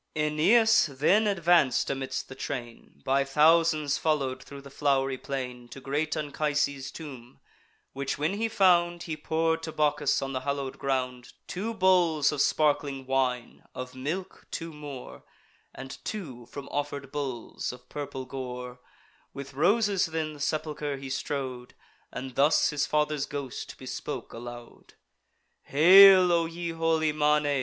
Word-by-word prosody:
Aeneas 185 Hz, +10 st, +4 dB
then 155 Hz, +10 st, +2 dB
advanc'd 170 Hz, -8 st, +3 dB
amidst 135 Hz, -1 st, -4 dB
the -, -, -9 dB
train, 120 Hz, -, -7 dB
By 135 Hz, +1 st, +2 dB
thousands 155 Hz, +1 st, +3 dB
follow'd 135 Hz, -5 st, 0 dB
thro' 140 Hz, -, -10 dB
the 140 Hz, 0 st, -13 dB
flow'ry 135 Hz, -2 st, +1 dB
plain, 125 Hz, -3 st, -5 dB
To 135 Hz, -, -10 dB
great 150 Hz, +4 st, -2 dB
Anchises' 145 Hz, -2 st, -1 dB
tomb; 130 Hz, -7 st, -10 dB, 0.5 s
which 135 Hz, +1 st, -3 dB
when 150 Hz, +6 st, 0 dB
he 220 Hz, +3 st, -1 dB
found, 175 Hz, -4 st, +3 dB
He 160 Hz, -, -4 dB
pour'd 160 Hz, +1 st, 0 dB
to 160 Hz, -, -5 dB
Bacchus, 150 Hz, -2 st, +1 dB
on 135 Hz, 0 st, -4 dB
the 130 Hz, -, -1 dB
hallow'd 140 Hz, 0 st, -4 dB
ground, 125 Hz, -2 st, -2 dB
Two 220 Hz, +5 st, -4 dB
bowls 175 Hz, -7 st, +3 dB
of 150 Hz, -2 st, -1 dB
sparkling 145 Hz, -3 st, +1 dB
wine, 130 Hz, -2 st, -1 dB
of 125 Hz, 0 st, -6 dB
milk 160 Hz, +9 st, -5 dB
two 165 Hz, -1 st, -5 dB
more, 145 Hz, -4 st, -9 dB, 0.5 s
And 135 Hz, +1 st, -8 dB
two 135 Hz, -, -6 dB
from 140 Hz, +2 st, -8 dB
offer'd 140 Hz, -1 st, -4 dB
bulls 135 Hz, -6 st, -4 dB
of 125 Hz, 0 st, -13 dB
purple 140 Hz, -3 st, -6 dB
gore, 125 Hz, -1 st, -7 dB, 0.6 s
With 140 Hz, 0 st, -8 dB
roses 195 Hz, -, +2 dB
then 160 Hz, -1 st, -3 dB
the 150 Hz, -, -12 dB
sepulcher 150 Hz, -1 st, -2 dB
he 135 Hz, -1 st, -7 dB
strow'd 130 Hz, -2 st, -4 dB, 0.4 s
And 130 Hz, 0 st, -6 dB
thus 145 Hz, +6 st, +3 dB
his 150 Hz, 0 st, -1 dB
father's 150 Hz, -1 st, 0 dB
ghost 140 Hz, -3 st, -6 dB
bespoke -, -, -6 dB
aloud: 120 Hz, 0 st, -10 dB, 0.7 s
"Hail, 185 Hz, +4 st, +8 dB
O 170 Hz, -1 st, +2 dB
ye 170 Hz, +1 st, -5 dB
holy 165 Hz, -1 st, +1 dB
manes! 150 Hz, 0 st, +2 dB
145 Hz, 140 wpm, -28 LUFS, 135-160 Hz, 0.7 s, Hail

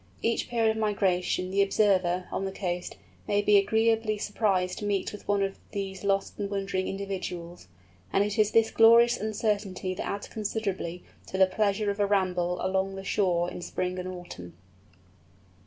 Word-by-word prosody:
Each 230 Hz, 0 st, 0 dB
period 230 Hz, -2 st, +2 dB
of 220 Hz, -, -4 dB
migration, 185 Hz, -3 st, 0 dB
the 200 Hz, +1 st, +3 dB
observer, 185 Hz, -3 st, +2 dB
on -, -, -2 dB
the 195 Hz, -, -3 dB
coast, 180 Hz, -2 st, -4 dB, 0.3 s
may 205 Hz, 0 st, +2 dB
be 205 Hz, 0 st, +6 dB
agreeably 220 Hz, +1 st, +2 dB
surprised 195 Hz, -3 st, 0 dB
to 210 Hz, -, -4 dB
meet 200 Hz, -1 st, -1 dB
with 210 Hz, -, -11 dB
one 200 Hz, -1 st, +2 dB
of 195 Hz, 0 st, -3 dB
these 195 Hz, -1 st, -4 dB
lost 195 Hz, +1 st, 0 dB
and 200 Hz, -1 st, -2 dB
wandering 195 Hz, -2 st, -2 dB
individuals; 185 Hz, -, -5 dB, 0.4 s
and 200 Hz, -, +3 dB
it 205 Hz, +1 st, -2 dB
is 210 Hz, -1 st, +4 dB
this 225 Hz, 0 st, +3 dB
glorious 235 Hz, +1 st, +6 dB
uncertainty 205 Hz, -3 st, -2 dB
that -, -, -5 dB
adds 200 Hz, -, -4 dB
considerably 195 Hz, -5 st, -3 dB, 0.2 s
to 190 Hz, -, -4 dB
the 190 Hz, -, +7 dB
pleasure 205 Hz, +1 st, 0 dB
of 200 Hz, -, -7 dB
a 205 Hz, -, +3 dB
ramble 180 Hz, -3 st, +1 dB
along 190 Hz, +1 st, 0 dB
the 195 Hz, -, -7 dB
shore 180 Hz, -3 st, +1 dB
in -, -, -7 dB
spring 180 Hz, +1 st, -3 dB
and 180 Hz, -, -4 dB
autumn. 130 Hz, -, -9 dB
195 Hz, 170 wpm, -28 LUFS, 185-210 Hz, 0.4 s, the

